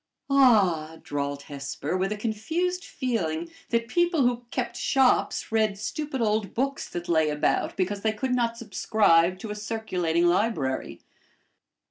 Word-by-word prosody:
"Ah!" 190 - +4
drawled 140 0 -3
Hesper, 140 +3 -4
with 190 +2 0
a 210 - -2
confused 325 - -2
feeling 170 - -2 0.2
that 230 -1 0
people 345 +2 +2
who 245 -1 0
kept - - -3
shops 265 -4 +2
read 215 -2 +1
stupid 280 +4 -4
old 215 -2 0
books 275 +3 -1
that 175 0 -5
lay 160 -3 +3
about, 150 0 0
because 200 +2 -1
they 220 - +1
could 250 +4 -2
not 235 -2 0
subscribe 195 -5 +2
to 210 +2 -7
a - - -4
circulating 185 -6 -1
library. 175 - 0
210 Hz, 140 wpm, -26 LUFS, 170-240 Hz, 0.2 s, Ah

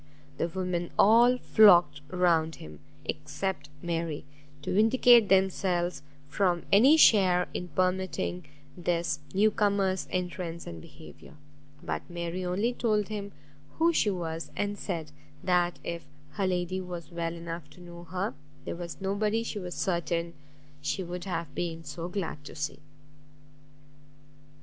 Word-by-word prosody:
The 165 - +1
women 175 -1 -2
all 235 +4 +6
flocked 175 -12 +6
around 170 -3 +2
him, 75 -1 -11 0.3
except 145 +1 -4
Mary, 165 -4 -2 0.4
to - - -2
vindicate 225 +1 +6
themselves 185 -2 +2 0.3
from 175 +2 +1
any 260 +10 +7
share 185 - +5
in 180 - -4
permitting 185 -1 -1 0.3
this 170 -3 -1
new 210 +3 +3
comer's 200 -3 +1
entrance 180 -2 -3
and 85 -1 -8
behaviour; - - -14 0.5
but - - -2
Mary 175 +1 -4
only 200 +7 0
told 215 -4 0
him 205 -2 -5 0.5
who 335 +1 +4
she 220 - +3
was, 165 -4 -4
and 205 0 -1
said, 165 -7 -4 0.3
that 175 -1 +2
if 170 0 -4 0.3
her 195 -2 -1
lady 180 +1 -1
was 175 -1 -7
well 170 0 -3
enough 165 -2 -7
to - - -17
know 175 -1 -11
her, 185 +5 -3 0.3
there - - -4
was 170 -1 -7
nobody 210 +3 0
she 220 -2 -4
was 180 -2 -6
certain 170 -2 -1 0.5
she 165 +6 -2
would 175 0 -6
have 170 -6 -4
been 165 0 -3
so 170 +1 -6
glad 175 -6 -4
to - - -9
see. 145 -2 -4
180 Hz, 135 wpm, -29 LUFS, 170-200 Hz, 0.5 s, any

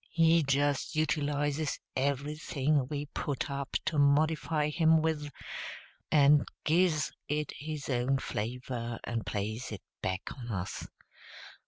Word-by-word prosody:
He 165 0 +5
just 145 +1 +1
utilizes 145 -1 0 0.2
everything 140 0 0
we 145 +1 -3
put 145 -1 -3
up 140 -1 -1
to 155 - +1
modify 150 +1 +3
him 160 +1 +4
with, 155 -2 0 0.8
and 145 0 +6 0.2
gives 160 -1 +3 0.2
it 150 0 -1
his 150 0 -5
own 130 +1 +2
flavor 120 0 -3
and 115 -2 -3
plays 110 +4 -3
it 105 - -6 0.2
back 95 +1 -3
on 120 -3 -8
us. 95 -4 -3
145 Hz, 120 wpm, -31 LUFS, 130-155 Hz, 0.8 s, and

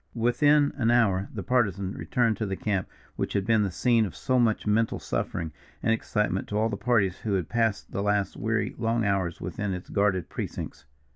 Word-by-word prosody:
Within 145 +5 +3
an 115 -4 +2
hour 100 -5 +3
the 100 - -5
Partisan 100 -6 +1
returned 120 -3 +1
to 110 - -2
the 95 - -2
camp 95 -2 -1 0.3
which - - -2
had 100 -2 0
been 110 0 +3
the 100 - +1
scene 115 +5 +2
of 100 - -4
so 130 -1 +1
much 115 -3 +2
mental 110 +2 +2
suffering 80 -1 -3 0.3
and 115 - +3
excitement 105 -3 -1
to 105 - -2
all 110 +1 +2
the 105 - -2
parties 100 -5 +1
who 105 - -2
had 90 -4 -1
passed 115 -4 0
the 100 - -2
last 105 -1 0
weary, 110 +1 -1
long 115 -1 +1
hours 95 -4 0
within 100 -2 -3
its 90 - -9
guarded 100 -4 +1
precincts. - - -6
105 Hz, 200 wpm, -27 LUFS, 100-115 Hz, 0.3 s, Within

